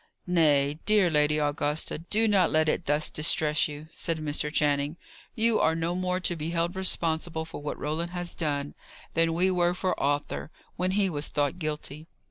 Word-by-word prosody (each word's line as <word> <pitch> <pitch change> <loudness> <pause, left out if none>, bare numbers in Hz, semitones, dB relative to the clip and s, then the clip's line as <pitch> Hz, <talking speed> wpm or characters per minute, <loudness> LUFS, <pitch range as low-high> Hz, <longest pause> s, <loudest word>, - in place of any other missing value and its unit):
"Nay, 150 -4 +3
dear 210 -5 +4
Lady 150 0 +3
Augusta, 150 +1 -1
do 215 +7 0
not 195 -5 +4
let 155 0 +2
it 155 - -1
thus 150 +2 +2
distress 150 0 +1
you," 150 +1 -9
said 165 -1 -2
Mr. 150 -1 -2
Channing. 145 +1 +1 0.4
"You 230 -1 +2
are 160 - +3
no 165 +1 -1
more 180 0 -1
to 175 - +2
be 160 0 -4
held 170 +1 -1
responsible 165 -3 0
for 160 - -8
what 145 - -4
Roland 160 +3 -2
has 175 -1 -5
done, 145 -3 -2 0.4
than 165 0 +2
we 185 +2 +3
were 175 -1 +2
for 185 0 0
Arthur, 145 +2 -1 0.3
when 180 +1 -1
he 200 0 +2
was 150 -4 -2
thought 145 +4 -1
guilty." 155 -1 -5
160 Hz, 180 wpm, -27 LUFS, 150-175 Hz, 0.4 s, dear